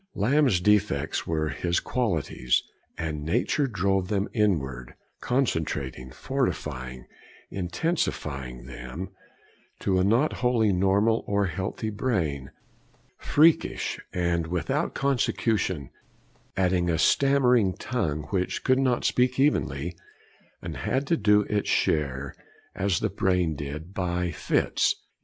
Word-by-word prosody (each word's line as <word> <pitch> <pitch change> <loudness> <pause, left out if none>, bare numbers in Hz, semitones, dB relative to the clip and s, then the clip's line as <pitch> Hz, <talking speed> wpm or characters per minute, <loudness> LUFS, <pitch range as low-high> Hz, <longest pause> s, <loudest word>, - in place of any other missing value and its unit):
IV - - -8
Lamb's 130 -3 +3
defects 105 -6 +1
were 80 -1 0
his 85 +2 0
qualities, 85 - 0 0.3
and 80 -3 -3
nature 120 - +1
drove 95 -4 0
them 100 0 0
inward, 70 - -1 0.2
concentrating, 75 - -1
fortifying, 65 - -3 0.5
intensifying 75 - -2
them; 65 +8 -7 0.7
to 95 -1 +1
a - - +3
not 115 +10 +3
wholly 115 -5 +3
normal 100 +5 +2
or 100 0 +1
healthy 95 +5 -3
brain, 85 - -1 0.7
freakish 160 +2 +2
and 85 -2 0
without 85 -1 -1
consecution, 110 - 0 0.7
adding 90 -2 +2
a 80 - +1
stammering 125 - +4
tongue 80 - -2
which 95 -2 -1
could 130 0 +3
not 130 -3 +1
speak 125 +1 +2
evenly, 85 - +1 0.7
and - - -5
had 135 +2 -1
to 165 - +2
do 105 -5 +4
its 105 0 -1
share, 70 -3 0 0.4
as 95 -3 0
the - - +1
brain 90 -4 +1
did, 75 +6 -6
'by 90 -2 -1
fits.' - - +1
95 Hz, 115 wpm, -26 LUFS, 75-115 Hz, 0.7 s, stammering